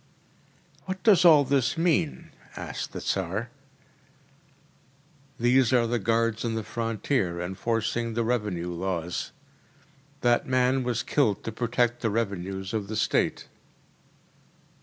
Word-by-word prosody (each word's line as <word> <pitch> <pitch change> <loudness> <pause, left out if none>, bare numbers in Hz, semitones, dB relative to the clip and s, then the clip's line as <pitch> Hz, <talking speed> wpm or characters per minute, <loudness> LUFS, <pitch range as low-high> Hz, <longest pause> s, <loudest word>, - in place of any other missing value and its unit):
“What 185 0 -5
does 210 -6 +6
all 155 -4 +8
this 140 +1 +1
mean?‚ÄĚ 165 -2 -2
asked - - -5
the - - -6
Tsar. 100 +5 -2 1.9
“These 125 +1 +4
are 120 -2 +4
the 120 +1 0
guards 115 +1 0
on 115 -2 -1
the 110 - -2
frontier, 110 -4 -1
enforcing 115 +5 -2
the 115 - +1
revenue 105 -7 -1
laws. 85 -1 -3 0.9
That 120 0 +2
man 130 +1 +2
was 120 -2 -1
killed 115 -9 +1
to 115 - -4
protect 120 +1 0
the 115 - +1
revenues 95 -2 -3
of 105 -3 -2
the 110 - -5
State. 105 - 0
115 Hz, 120 wpm, -27 LUFS, 100-125 Hz, 1.9 s, all